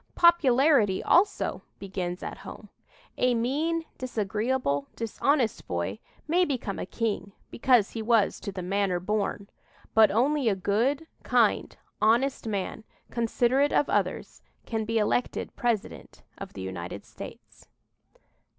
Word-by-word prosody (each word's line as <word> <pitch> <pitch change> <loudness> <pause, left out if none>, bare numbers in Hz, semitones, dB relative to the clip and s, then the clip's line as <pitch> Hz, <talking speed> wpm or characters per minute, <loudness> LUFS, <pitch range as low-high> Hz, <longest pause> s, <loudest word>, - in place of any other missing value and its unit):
Popularity, 275 - +4
also, 395 +4 +2 0.2
"begins 185 -2 -4
at - - -6
home." - - -10 0.5
A 250 -1 +3
mean, 310 +8 0
disagreeable, 215 - -1
dishonest 230 +2 0
boy 85 +4 -2 0.3
may 350 +4 +3
become 255 - -2
a - - -4
king, 200 -3 -2 0.2
because 240 -4 +3
he 225 - -4
was 220 -2 +2
"to 200 - -5
the 185 -2 -6
manner 190 -1 0
born." 200 +1 -2 0.5
But 220 -1 +7
only 265 +3 +2
a 200 - +1
good, 230 - 0 0.2
kind, - - +2 0.2
honest 235 +3 +2
man, 205 +1 -3 0.3
considerate 245 +4 +2
of 290 - +2
others, - - -1 0.2
can 220 -2 -2
be 225 +1 0
elected 220 +3 0
President 235 -4 -3
of - - -9
the 95 - -7
United 95 +1 -6
States. - - -12
225 Hz, 125 wpm, -27 LUFS, 200-260 Hz, 0.5 s, But